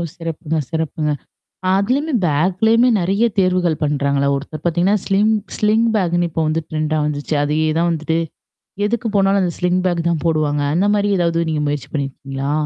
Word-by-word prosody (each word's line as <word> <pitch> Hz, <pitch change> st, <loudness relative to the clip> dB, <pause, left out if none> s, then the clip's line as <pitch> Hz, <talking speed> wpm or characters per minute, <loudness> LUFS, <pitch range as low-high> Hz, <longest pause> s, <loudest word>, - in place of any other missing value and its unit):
சிறப்புங்க, 160 Hz, -1 st, -4 dB
சிறப்புங்க! 160 Hz, -1 st, -2 dB, 0.6 s
அதுலயும் 250 Hz, +5 st, +1 dB
பேக்லயுமே 190 Hz, -, +3 dB
நிறைய 195 Hz, +6 st, +1 dB
தேர்வுகள் 180 Hz, -4 st, +1 dB
பண்றாங்களே. 140 Hz, -1 st, +1 dB
ஒருத்தர் 150 Hz, +2 st, -7 dB
பாத்தீங்கன்னா, 175 Hz, +5 st, +2 dB
ஸ்லிங் 205 Hz, +3 st, +2 dB, 0.2 s
ஸ்லிங் 220 Hz, +2 st, +2 dB
பேக் 175 Hz, -4 st, +1 dB
இப்ப 160 Hz, -, -2 dB
வந்து 155 Hz, +1 st, -1 dB
ட்ரெண்டா 155 Hz, 0 st, -1 dB
வந்துச்சு. 150 Hz, +1 st, -2 dB
அதே 150 Hz, +2 st, 0 dB, 0.2 s
தான் 170 Hz, -, +2 dB
வந்துட்டு. 160 Hz, 0 st, -1 dB, 0.7 s
எதுக்கு 235 Hz, +2 st, -2 dB
போனாலும் 195 Hz, 0 st, +3 dB
அந்த 175 Hz, -, -1 dB
ஸ்லிங் 180 Hz, 0 st, +1 dB
பேக் 170 Hz, -2 st, 0 dB
தான் 160 Hz, -4 st, -1 dB
போடுவாங்க. 150 Hz, -2 st, +1 dB
அந்த 195 Hz, +4 st, +2 dB
மாதிரி 205 Hz, 0 st, +1 dB
ஏதாவது 170 Hz, -1 st, +1 dB
நீங்க 150 Hz, -1 st, -1 dB
முயற்சி 145 Hz, -1 st, -3 dB
பண்ணி 140 Hz, -2 st, -1 dB
இருக்கீங்களா? 135 Hz, +1 st, -5 dB
165 Hz, 155 wpm, -19 LUFS, 150-195 Hz, 0.7 s, பேக்லயுமே